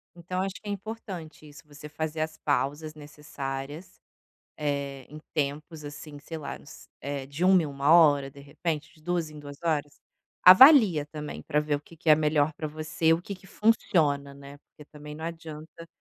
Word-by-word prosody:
então 175 +2 -5
eu 190 - +1
acho 195 0 -5
que 215 - -11
é - - -1
importante 195 -7 -7
isso, 150 0 -14
você 150 0 -11
fazer 155 +1 -4
as 155 0 -3
pausas 145 +2 -1
necessárias, 150 +2 -7 0.6
eh, 140 -2 -3
em 150 - -9 0.2
tempos 150 +2 -3
assim 145 0 -9
sei 160 +3 -8
lá, 145 - -6
uns 145 - -14
eh, 140 -1 -4
de 140 +6 -3
1 185 -1 +6
em 155 - -3
1 140 +2 +1
hora, 145 -5 +5
de 140 - -14
repente, 150 +3 -4
de 155 - -22
2 175 -1 -1
em 150 - -11
2 145 -1 -10
horas, 150 -3 -2 0.4
avalia 195 - +8
também 150 0 -7
para 150 - 0
ver 150 -1 -1
o - - -7
que 165 +3 -17
que 165 0 -5
é 155 - +9
melhor 150 0 +2
para 155 +1 -5
você, 155 +1 0
o 165 - +1
que 200 +3 -7
que 190 0 -17
funciona, 160 -10 +1
né, 140 0 -12
porque 150 - -18
também 150 0 -10
não 160 +1 -7
adianta 165 0 -8
155 Hz, 195 wpm, -27 LUFS, 145-165 Hz, 0.6 s, é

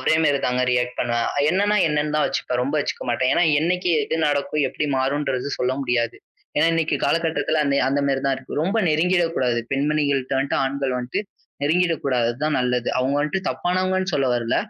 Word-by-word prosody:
ஒரே - - +2
மாரிதாங்க 135 -4 +1
ரியக்ட் 125 0 0
பண்ணுவேன். 120 -1 0 0.2
என்னன்னா 205 +3 +2
என்னன்னுதான் 150 0 0
வச்சுப்பேன். 125 0 -2
ரொம்ப 140 +4 -2
வச்சுக்க - - -4
மாட்டேன். 130 +1 +1
ஏன்னா 175 - +3 0.2
என்னைக்கு 180 +2 0
எது 160 - -2
நடக்கும், 145 +1 0
எப்படி 150 - -3
மாறும்ன்றது 135 0 -1
சொல்ல 125 +1 0
முடியாது. 120 -3 0 0.4
ஏன்னா 150 +2 +4
இன்னைக்கு 165 -1 +1
கால - - +3
கட்டத்துல 160 -1 0
அந்த 140 -1 +1
அந்த 140 +1 +1
மாரிதான் 135 0 +1
இருக்கு. 135 +2 -6
ரொம்ப 195 +6 0
நெருங்கிடக் 170 +2 +2
கூடாது. 125 -2 +1
பெண்மணிகள்ட்ட 140 -2 0
வன்ட்டு, 135 +1 0
ஆண்கள் 135 -1 -2
வன்ட்டு 125 +6 -3 0.4
நெருங்கிடக் 165 +2 +1
கூடாதுதான் 130 +3 0
நல்லது. 125 -1 0
அவங்க 130 +2 0
வந்துட்டு 185 +6 -2
தப்பானவங்கன்னு 185 +1 -1
சொல்ல 135 -2 +1
வரல. 120 -1 -1
140 Hz, 165 wpm, -22 LUFS, 130-160 Hz, 0.4 s, ஏன்னா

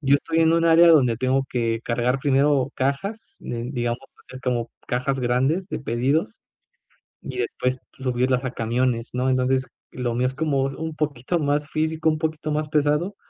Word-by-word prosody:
Yo 140 -1 +3
estoy 160 +3 0
en 160 0 +4
un 165 0 +2
área 165 +1 +7
donde 130 -8 +5
tengo 130 +3 +1
que 115 -2 -1
cargar 125 +2 0
primero 135 -1 +2
cajas, 145 +12 -3
digamos, 120 0 -3 0.3
hacer 130 - -10
como 120 -3 -1 0.2
cajas 130 +2 -1
grandes 135 +10 +1
de - - -3
pedidos 125 0 -1 0.8
y 130 -2 -7
después 125 +1 -1 0.2
subirlas 125 0 0
a 130 - -2
camiones, 120 0 -1
¿no? 125 +1 0
Entonces, 130 +1 +1 0.2
lo 125 -2 -2
mío 125 +1 +1
es 130 - -3
como 140 -2 0
es 135 - -5
un 160 +2 -5
poquito 150 +2 -1
más 145 0 0
físico, 160 +1 0
un 155 - 0
poquito 155 -1 -3
más 150 0 -1
pesado. 150 +6 +1
135 Hz, 170 wpm, -23 LUFS, 125-155 Hz, 0.8 s, área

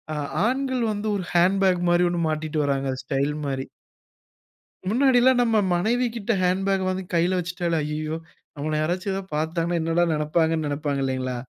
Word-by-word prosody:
அ - - -3 0.3
ஆண்கள் 260 -1 0
வந்து 210 +1 -4
ஒரு 195 - -2
ஹேண்ட்பேக் 185 0 +3
மாரி 175 +1 +4
1 175 -1 -1
மாட்டிட்டு 155 0 -1
வர்றாங்க 135 -1 0
ஸ்டைல் 140 +1 -1
மாரி. 135 -1 -2 1.2
முன்னாடில்லாம் 255 +1 +4
நம்ம 230 -2 +2 0.2
மனைவி 230 +8 +1
கிட்ட 230 0 -2
ஹேண்ட்பேக் 190 +1 +1
வாங்கி 185 0 -2
கையில 175 +2 +2
வச்சிட்டாலே, 175 -1 -2
"அய்யய்யோ! 155 +1 -3 0.4
நம்மள 155 +2 -3
யாராச்சும் 180 +5 -1
ஏதா 195 - -2
பார்த்தாங்கன்னா 165 +2 -1
என்னடா 165 +2 +2
நெனப்பாங்கன்னு" 160 +1 +1
நெனப்பாங்க 145 -1 -2
இல்லைங்களா? 130 -1 -2
175 Hz, 145 wpm, -24 LUFS, 155-195 Hz, 1.2 s, மாரி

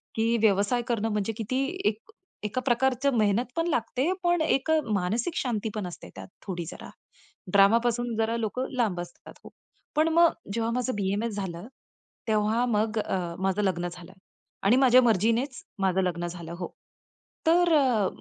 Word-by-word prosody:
की 225 +1 +2
व्यवसाय 205 +3 +3
करणं 225 -3 0
म्हणजे 210 +1 -1
किती 255 +4 -1 0.2
एक 215 0 -6 0.4
एका 215 +5 -2
प्रकारची 265 +2 +2
मेहनत 215 +2 +2
पण 330 +1 0
लागते, 260 +1 0
पण 350 -1 +2
एक 315 -1 +1 0.2
मानसिक 215 - -1
शांतीपण 215 -5 -2
असते 175 - -10
त्यात - - -9 0.2
थोडी 175 -4 -4
जरा. 160 - -9 0.6
ड्रामापासून 230 +4 +3
जरा 225 +1 0
लोकं 235 +4 -2
लांब 215 -8 +1
असतात 175 0 -12
हो. - - -11 0.5
पण 310 +1 +3
मग 335 0 +5 0.2
जेव्हा 230 +1 -1
माझं 250 +1 -1
बी-एम-एस 205 +3 -1
झालं 190 -1 -5 0.6
तेव्हा 215 +3 +2
मग, 220 -1 0
अ, 180 -4 -2
माझं 190 +2 +1
लग्न 175 -2 0
झालं. 175 +1 -12 0.5
आणि 200 +5 +5
माझ्या 255 -1 +6
मर्जीनेच 230 +4 +1 0.2
माझं 190 -1 +2
लग्न 175 -2 -2
झालं 170 -1 -8
हो. 180 - -3 0.8
तर, 345 +1 +4
अ, 250 -9 +3
225 Hz, 150 wpm, -27 LUFS, 195-250 Hz, 0.8 s, माझ्या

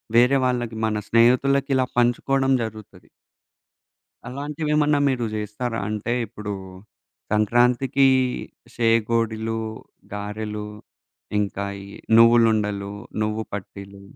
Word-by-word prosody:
వేరే 125 +3 +5
వాళ్ళకి 120 -2 -1
మన 110 -1 0
స్నేహితులకి 130 +4 +3
ఇలా 130 -1 +2
పంచుకోవడం 135 +3 +2
జరుగుతది. 110 -4 -9 1.2
అలాంటివెమన్నా 150 +2 0
మీరు 125 -3 -1
చేస్తారా? 110 +3 -3
అంటే 110 +2 -2
ఇప్పుడు 105 -1 -6 0.8
సంక్రాంతికి 120 +5 +3 0.7
సేగోడిలు, 115 -1 +1 0.5
గారెలు, 105 +1 -5 0.7
ఇంకా 100 -1 -2 0.2
ఈ - - -10 0.3
నువ్వులుండలు, 110 -4 +4 0.3
నువ్వు 105 +1 -2
పట్టీలు 100 0 -8
115 Hz, 85 wpm, -23 LUFS, 105-125 Hz, 1.2 s, వేరే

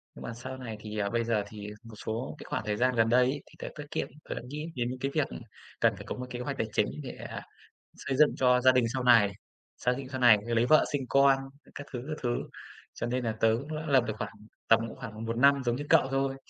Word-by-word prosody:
Nhưng - - -10
mà 115 - -5
sau 125 +2 -7
này 115 -4 -6
thì, 105 0 -7
ờ 100 -1 0
bây 115 0 0
giờ 110 -3 +1
thì 105 -1 -8 0.2
một 115 -1 -11
số 115 +6 -3
cái - - -9
khoảng - - -2
thời 105 -1 -1
gian 125 0 +2
gần 115 0 +3
đây 125 +1 +5
ấy, 140 +2 -1
thì - - -21
tớ - - -5
tiết 145 - -6
kiệm, - - -1 0.2
tớ - - -2
nghĩ 150 +2 -5
đến 120 -1 -1
những 130 0 -5
cái 135 +1 -2
việc 155 -2 +1 0.5
cần - - +3
phải - - -9
có - - -3
một 125 - -5
kế 120 - -5
hoạch 135 +2 -4
tài 110 - -1
chính 105 - +2 0.2
để, - - -5 0.2
à, - - -6 0.5
xây 135 -2 -3
dựng 150 - +5
cho 125 -1 +4
gia 130 0 +7
đình 125 -2 +3
sau 130 -1 -1
này, 115 -5 +6 0.5
xác 125 - +1
định 135 -1 -7
sau 130 -1 -4
này 115 -4 +8
lấy 115 0 +2
vợ 155 +3 +5
sinh 140 - +1
con, 140 0 +5 0.4
các 145 - -7
thứ, 120 - -3
các 155 0 -4
thứ. 120 0 +1 0.6
Cho 120 - -3
nên 125 +1 -1
là 110 - +1
tớ 115 0 +5
cũng 155 +2 -7
lập 135 -4 +5
được 110 - -1
khoảng - - -4 0.4
tầm 115 - +6
cũng - - -11
khoảng 115 -2 -7
1 115 +1 -2
năm 140 +1 +5
giống 120 0 +1
như 145 - -4
cậu 130 - +5
thôi. 135 0 0
125 Hz, 270 wpm, -29 LUFS, 115-135 Hz, 0.6 s, này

